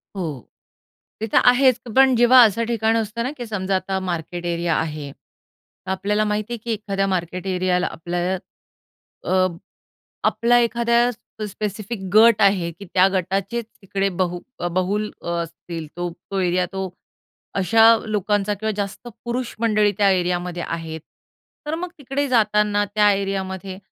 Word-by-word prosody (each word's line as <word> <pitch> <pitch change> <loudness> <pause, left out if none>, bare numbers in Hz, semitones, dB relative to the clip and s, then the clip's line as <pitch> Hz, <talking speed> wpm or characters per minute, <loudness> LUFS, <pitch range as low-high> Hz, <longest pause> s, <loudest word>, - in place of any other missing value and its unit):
हो. 155 -10 -5 0.7
ते 220 - -1
तर - - +5
आहेच 255 0 +4 0.2
पण 265 -1 +6
जेव्हा 240 +2 +7
असं 225 +2 +1
ठिकाण 225 -1 +1
असतं 225 +1 -2
ना, 255 - -2
की 245 - -5
समजा 195 -3 -2
आता 190 +1 -1
मार्केट 175 -1 -4
एरिया 170 -1 0
आहे. 150 -3 -3
तर 185 +6 -14
आपल्याला 205 +3 0
माहिती 210 +2 -2
आहे, - - -3
की 235 - -3
एखाद्या 200 -2 -2
मार्केट 185 0 -2
एरियाला 180 -1 +1
आपल्याला 175 +3 -2 0.9
अ, 185 0 +3 0.8
आपला 240 +1 +3
एखाद्या 235 +1 +2 0.3
प - - -5
स्पेसिफिक 210 +2 -5
गट 225 0 +7
आहे 195 -4 +3
की 200 +5 -12
त्या 185 0 +6
गटाचे 195 +4 -1
तिकडे 195 -3 -3
बहु 175 -1 0 0.3
बहुल 200 +4 0
असतील, 170 -1 -5
तो. 175 0 -2 0.2
तो 195 - -2
एरिया 180 0 +1
तो 190 0 -3 0.7
अशा 225 +4 +5 0.2
लोकांचा 210 -1 0
किंवा 220 +2 -3
जास्त 205 +3 -4 0.2
पुरुष 240 +1 -3
मंडळी 215 -2 +3
त्या 200 -1 +5
एरियामध्ये 175 -1 -1
आहेत. 160 -1 -5 0.7
तर 300 - -1
मग 350 +2 -4
तिकडे 280 +1 -2
जाताना 210 -3 +2
त्या 210 -1 +5
एरियामध्ये, 195 -1 -3
195 Hz, 145 wpm, -22 LUFS, 180-225 Hz, 0.9 s, जेव्हा